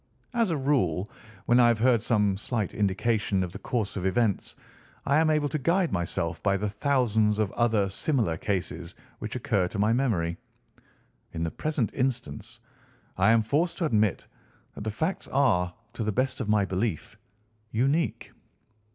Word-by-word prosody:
As 230 -4 +2
a 165 - 0
rule, 115 - 0 0.3
when 120 +1 +4
I 120 - +7
have 120 -1 +3
heard 120 0 +3
some 105 -4 +2
slight 105 0 -3
indication 100 -1 +1
of 90 - -5
the - - -8
course 115 -5 -2
of 95 - -3
events, 100 +1 0 0.5
I 140 - +3
am 160 0 +3
able 150 -1 +2
to 155 - -2
guide 170 +5 +1
myself 85 -2 -2
by 100 -1 +2
the 105 +2 -2
thousands 110 -2 +1
of 105 -2 0
other 115 -4 +2
similar 110 - 0
cases 90 -2 -3 0.2
which - - -5
occur 90 -2 +1
to 100 - -7
my 105 +3 +3
memory. 100 -10 0 1.0
In 80 - -3
the 80 - -2
present 150 -8 -1
instance 120 -3 -3 0.6
I 95 +3 +3
am 115 -1 +4
forced 155 +9 0
to 170 - 0
admit 110 - +1 0.5
that - - -8
the - - 0
facts 160 - -2
are, 110 -11 +2 0.2
to 120 - -3
the 110 - 0
best 130 +4 -1
of 105 - -3
my 105 -2 +3
belief, 95 -1 -2 0.5
unique." 135 +9 0
110 Hz, 170 wpm, -27 LUFS, 95-130 Hz, 1.0 s, I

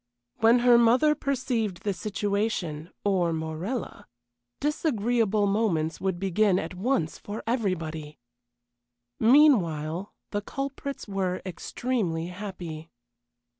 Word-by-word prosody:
When 225 +2 +6
her 240 -1 +7
mother 245 +6 +5
perceived 245 -9 -2
the 205 - 0
situation 200 -5 -2 0.2
or 185 -4 +2
Morella 160 +9 -4 0.5
disagreeable 230 - +1
moments 195 -6 0
would 190 -2 0
begin 195 +1 +2
at - - -3
once 180 -4 -1
for 205 +2 -6
everybody! 165 - -2 1.0
Meanwhile, 195 - +4 0.2
the 205 - -1
culprits 275 +4 -5
were 190 -2 -2
extremely 180 -2 -2
happy. 180 -4 -7
200 Hz, 95 wpm, -27 LUFS, 175-235 Hz, 1.0 s, her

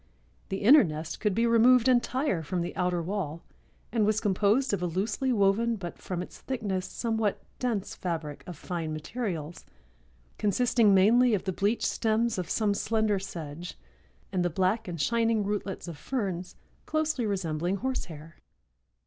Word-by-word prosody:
The 195 +1 -3
inner 275 +7 +8
nest 155 -1 -5
could 210 -4 0
be 230 - +2
removed 235 +2 +5
entire 255 - +2
from 175 +3 -2
the 175 - -4
outer 180 -1 0
wall, 170 -4 -3 0.5
and 225 -1 +2
was 215 +1 +2
composed 210 +6 +2
of 195 - 0
a 180 - 0
loosely 205 +9 -1
woven 225 +2 +2
but, 175 -5 -7
from 180 -1 -4
its - - -12
thickness, 200 -8 -3
somewhat 220 -1 -1 0.2
dense 225 -6 -2
fabric 160 -5 -4
of 175 -4 -7
fine 165 -2 -4
materials, 165 -2 -4 0.8
consisting 215 0 +3
mainly 230 +5 +5
of 190 - -3
the 190 -1 -2
bleached 205 +5 0
stems 225 -1 +1
of 180 - -4
some 210 -2 +1
slender 215 -1 +1
sedge 170 -2 -7 0.5
and 180 -2 0
the 175 - +1
black 190 +6 0
and 170 -2 -5
shining 230 +3 +2
rootlets 200 -2 -3
of 165 -4 -7
ferns, 185 - -3 0.3
closely 310 -7 0
resembling 175 -2 -1
horsehair. 170 - -5
200 Hz, 155 wpm, -28 LUFS, 175-230 Hz, 0.8 s, inner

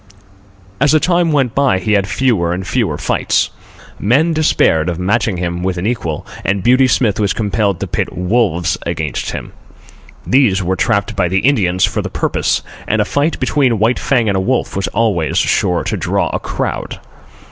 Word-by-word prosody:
As 140 +3 +3
the 155 - +5
time 175 0 +1
went 135 -6 +1
by, 135 -7 +2
he 100 +3 -1
had 100 -1 +2
fewer 105 -12 +1
and 90 +1 -4
fewer 100 - -1
fights. - - 0 0.5
Men 145 +11 +2
despaired 90 - +2
of 85 - -3
matching 100 +2 0
him 85 0 -3
with 90 0 -2
an 90 - -3
equal, 105 -10 -2 0.2
and 95 0 -1
Beauty 130 +3 +4
Smith 115 -5 +1
was 100 -2 +1
compelled 100 -3 -1
to - - -2
pit - - -2
wolves 90 -1 0
against 80 -5 -3
him. - - -6 0.7
These 115 -8 +3
were 95 +2 0
trapped 100 +1 0
by 90 -2 +1
the 95 +2 0
Indians 95 -9 +2
for - - -2
the - - -5
purpose, - - -1 0.2
and 110 - +1
a 105 - +2
fight 145 +8 0
between 130 -6 +1
White 110 +4 +1
Fang 120 -5 +1
and 100 - +1
a - - +1
wolf 125 +6 -1
was 95 - -1
always 100 -8 0
sure 90 -1 +1
to - - -2
draw - - -1
a - - -1
crowd. - - -4
105 Hz, 185 wpm, -16 LUFS, 90-125 Hz, 0.7 s, the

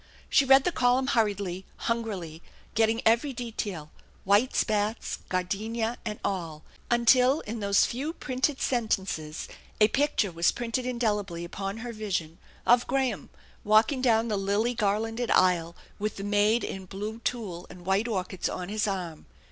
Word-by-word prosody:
She 280 - +5
read 270 0 +7
the 355 - +1
column 255 -2 +2
hurriedly, 200 -6 0
hungrily, 195 -9 -3 0.3
getting 225 +1 +2
every 235 +5 +3
detail, 205 -10 -5 0.3
white 205 +6 +3
spats, 215 +1 0
gardenia, 220 +6 -2
and 215 -2 -4
all 165 -6 -3 0.3
fc 240 - +4
until 250 +4 +5
in 220 +2 -5
those 200 -1 +3
few 270 +6 -3
printed 260 -1 -1
sentences 190 -10 -1 0.3
a 210 0 +6
picture 275 -7 +1
was 170 0 +2
printed 240 +1 -3
indelibly 210 -8 -1
upon 195 +3 -5
her 240 - -5
vision, 180 -7 -3 0.3
of 240 0 +4
Graham 265 -2 -1 0.3
walking 220 +5 +4
down 230 -2 +3
the 210 -3 0
lily 205 +5 +1
garlanded 225 +2 -1
aisle 175 -2 +3 0.2
with 210 0 -2
the 195 - -5
maid 205 +3 +2
in 190 -1 -5
blue 210 +4 -5
tulle 215 -8 -4
and 175 -1 -12
white 195 +4 +1
orchids 190 -4 -2
on 180 0 -5
his 215 +1 0
arm. 180 -5 -4
215 Hz, 150 wpm, -28 LUFS, 190-235 Hz, 0.3 s, read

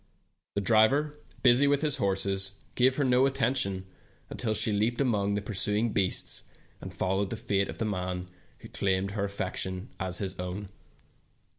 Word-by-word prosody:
The 100 - 0
driver, 120 +9 +3 0.3
busy 130 +3 +6
with 145 +1 +2
his 150 -3 +2
horses, 95 0 0 0.2
gave 130 +1 +3
her 145 - +1
no 130 0 +4
attention 125 -8 0 0.5
until 110 -3 -1
she 110 +1 +5
leaped 110 +4 0
among 105 -7 +1
the 105 - -2
pursuing 105 +2 +1
beasts, 95 -2 +1 0.4
and - - -7
followed 95 +1 -1
the 115 - -4
fate 100 -2 0
of - - -6
the 115 - -2
man 90 -3 -3 0.4
who - - -10
claimed 95 0 0
her 100 -1 -2
affection 95 +1 -3
as 95 -2 -1
his 95 -3 -2
own. 90 +2 -5
100 Hz, 160 wpm, -28 LUFS, 95-120 Hz, 0.5 s, busy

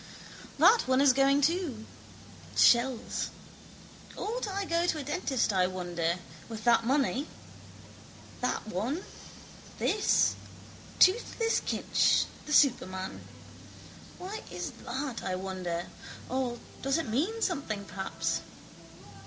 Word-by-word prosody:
That 465 - +5
one 260 0 +3
is 275 -2 +6
going 275 +2 +4
too. 295 - 0 0.7
Shells. 240 0 +3 0.9
Ought 465 +2 -3
I 395 0 -2
go 340 0 +1
to 320 - +1
a 300 - -4
dentist, 275 - 0
I 185 -1 +3
wonder, 175 -2 -2 0.3
with 220 -1 -7
that 235 0 +4
money? 275 +1 +1 1.1
That 250 - -1
one. 235 - -2 0.7
This. 420 - +3 0.6
Toothless 455 +3 +3
Kinch, - - +2 0.2
the - - -5
superman. 190 -10 +2 1.0
Why 395 +4 -6
is 180 0 -4 0.2
that, 260 0 -3
I 185 - -1
wonder, 185 -2 -4 0.4
or 255 -2 -1 0.2
does 275 +3 +1
it 325 - -2
mean 320 - 0
something 225 - -2
perhaps? 190 +2 -3
260 Hz, 110 wpm, -30 LUFS, 200-325 Hz, 1.1 s, is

